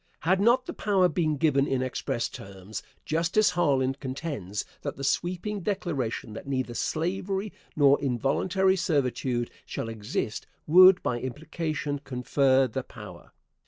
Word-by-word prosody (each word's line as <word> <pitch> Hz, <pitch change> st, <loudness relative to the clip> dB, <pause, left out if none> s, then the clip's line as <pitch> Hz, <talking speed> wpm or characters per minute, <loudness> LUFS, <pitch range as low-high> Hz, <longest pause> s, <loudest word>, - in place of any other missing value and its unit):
Had 190 Hz, +4 st, +2 dB
not 240 Hz, +4 st, +4 dB
the -, -, -5 dB
power 195 Hz, -3 st, +2 dB
been 155 Hz, -2 st, 0 dB
given 140 Hz, -2 st, +2 dB
in 130 Hz, -1 st, 0 dB
express 120 Hz, -2 st, -2 dB
terms, 95 Hz, +2 st, -8 dB, 0.2 s
Justice 170 Hz, +7 st, +2 dB
Harlan 135 Hz, -6 st, +2 dB
contends 130 Hz, -, -5 dB, 0.2 s
that -, -, -4 dB
the 140 Hz, -, -6 dB
sweeping 180 Hz, +8 st, -1 dB
declaration 150 Hz, -, -2 dB
that 110 Hz, -, -8 dB
neither 130 Hz, -3 st, -2 dB
slavery 190 Hz, -, -2 dB, 0.2 s
nor 140 Hz, -2 st, +5 dB
involuntary 170 Hz, -, +1 dB
servitude 130 Hz, -8 st, 0 dB
shall 115 Hz, -, -5 dB
exist 110 Hz, 0 st, -4 dB, 0.2 s
would 185 Hz, +3 st, +7 dB
by 120 Hz, -, -1 dB
implication 150 Hz, +2 st, -3 dB
confer 135 Hz, 0 st, +2 dB
the 120 Hz, -, -3 dB
power. -, -, -12 dB
145 Hz, 130 wpm, -27 LUFS, 130-180 Hz, 0.2 s, would